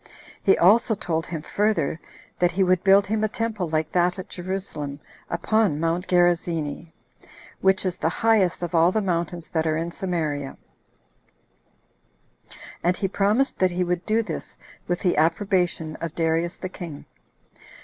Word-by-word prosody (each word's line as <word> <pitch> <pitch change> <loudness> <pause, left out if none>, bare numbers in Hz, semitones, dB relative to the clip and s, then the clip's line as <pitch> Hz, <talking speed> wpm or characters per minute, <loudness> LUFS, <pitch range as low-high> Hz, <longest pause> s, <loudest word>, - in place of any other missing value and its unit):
He 195 - +4
also 220 +5 +5
told 165 -5 -2
him 160 -3 -5
further, 185 -8 0 0.4
that 175 -1 +2
he 190 +2 +2
would 185 -1 +2
build 195 +1 +6
him 215 +1 -1
a - - +3
temple 215 -4 -3
like 155 0 -1
that 180 +1 +2
at 185 - -7
Jerusalem, 175 -6 -4 0.3
upon 175 -1 +1
Mount 165 +3 -1
Gerizzini, 170 -3 +1 0.7
which 190 0 +2
is 185 -1 -1
the 160 - 0
highest 200 -4 +2
of 175 - -4
all 170 +1 +5
the 220 - +1
mountains 170 -3 -2
that 160 -1 0
are 155 0 +1
in 165 +1 -3
Samaria; 155 -7 -3 2.3
and 180 +2 +2
he 195 - 0
promised 210 +8 +1
that 185 - +4
he 180 +1 -1
would 180 0 -1
do 225 +1 +2
this - - -7 0.3
with 175 0 -1
the 180 - +1
approbation 165 -1 +1
of 165 -1 -5
Darius 165 +1 0
the 185 - -5
king. 170 -6 -8
175 Hz, 155 wpm, -24 LUFS, 165-195 Hz, 2.3 s, build